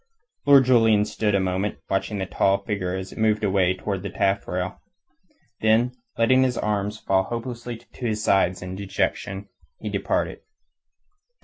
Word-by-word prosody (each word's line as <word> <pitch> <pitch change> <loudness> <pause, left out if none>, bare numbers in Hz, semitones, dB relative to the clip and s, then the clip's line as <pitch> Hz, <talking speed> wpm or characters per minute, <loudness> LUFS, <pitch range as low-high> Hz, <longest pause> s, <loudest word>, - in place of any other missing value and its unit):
Lord 140 -2 +8
Julian 115 -4 +4
stood 105 -1 0
a - - +3
moment, 95 +2 -1
watching 100 +2 -1
the 95 - -2
tall 100 +1 +1
figure 95 -3 -2
as 95 0 -5
it - - -10
moved 110 -1 +2
away 95 -2 +2
towards 95 0 -3
the 100 - -4
taffrail. 95 -1 -1 0.8
Then 110 +3 +3 0.3
letting 130 +3 +4
his 125 -2 +1
arms 105 0 -1
fall 95 -2 +1
helplessly 120 0 -5
to 120 +1 -7
his 110 -1 -2
sides 95 -3 +2
in 90 0 -6
dejection, 100 0 -2 0.3
he - - -4
departed. - - -1
105 Hz, 150 wpm, -24 LUFS, 95-115 Hz, 0.8 s, Lord